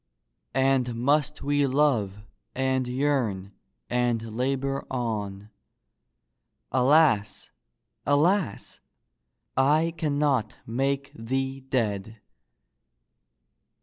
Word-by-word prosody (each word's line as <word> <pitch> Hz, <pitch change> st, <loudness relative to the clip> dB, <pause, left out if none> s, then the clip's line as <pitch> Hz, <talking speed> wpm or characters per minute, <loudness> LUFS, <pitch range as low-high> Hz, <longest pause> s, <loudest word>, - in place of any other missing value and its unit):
And 130 Hz, -2 st, +2 dB
must 145 Hz, +4 st, +1 dB
we 145 Hz, 0 st, +2 dB
love 120 Hz, -8 st, +1 dB, 0.3 s
and 130 Hz, -1 st, 0 dB
yearn 125 Hz, -8 st, -1 dB, 0.4 s
and 120 Hz, -3 st, -1 dB
labor 135 Hz, +2 st, -1 dB
on? 105 Hz, -5 st, -4 dB, 1.2 s
Alas! 130 Hz, -4 st, +3 dB, 0.5 s
alas! 155 Hz, -, +1 dB, 0.8 s
I 155 Hz, +5 st, +3 dB
cannot 145 Hz, -7 st, 0 dB
make 135 Hz, +4 st, -1 dB
thee 135 Hz, +3 st, -3 dB
dead 110 Hz, -5 st, -2 dB
130 Hz, 70 wpm, -26 LUFS, 115-140 Hz, 1.2 s, Alas